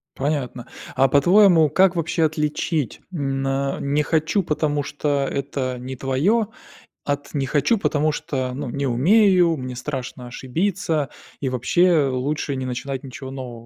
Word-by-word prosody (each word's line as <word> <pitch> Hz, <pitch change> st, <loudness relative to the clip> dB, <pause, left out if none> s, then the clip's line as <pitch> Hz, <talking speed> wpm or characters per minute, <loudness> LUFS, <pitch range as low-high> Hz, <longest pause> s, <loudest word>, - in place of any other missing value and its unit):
Понятно. 135 Hz, -4 st, -2 dB, 0.3 s
А 135 Hz, +1 st, +4 dB
по-твоему, 175 Hz, +2 st, +5 dB
как 190 Hz, +1 st, +4 dB
вообще 165 Hz, 0 st, 0 dB
отличить, 150 Hz, -1 st, -1 dB
м, 135 Hz, -4 st, -2 dB
на 135 Hz, 0 st, -1 dB
не 145 Hz, +2 st, 0 dB
хочу, 160 Hz, +6 st, +1 dB
потому 150 Hz, -3 st, 0 dB
что 145 Hz, -1 st, -1 dB
это 135 Hz, -2 st, -3 dB
не 130 Hz, +1 st, -6 dB
твое, 160 Hz, -, +1 dB, 0.6 s
от 145 Hz, +1 st, -3 dB
не 140 Hz, -2 st, 0 dB
хочу, 150 Hz, -, +2 dB
потому 155 Hz, -5 st, +1 dB
что, 130 Hz, -3 st, -3 dB
ну, 135 Hz, 0 st, -4 dB
не 140 Hz, +3 st, -2 dB
умею, 175 Hz, -, +4 dB
мне 130 Hz, -1 st, -6 dB
страшно 125 Hz, -1 st, -5 dB
ошибиться, 155 Hz, +4 st, -1 dB, 0.3 s
и 135 Hz, -, -1 dB
вообще 155 Hz, +6 st, +3 dB
лучше 140 Hz, +2 st, -2 dB
не 130 Hz, -1 st, -3 dB
начинать 130 Hz, +2 st, -4 dB
ничего 130 Hz, 0 st, -8 dB
нового? 125 Hz, -3 st, -8 dB
140 Hz, 145 wpm, -22 LUFS, 130-160 Hz, 0.6 s, по-твоему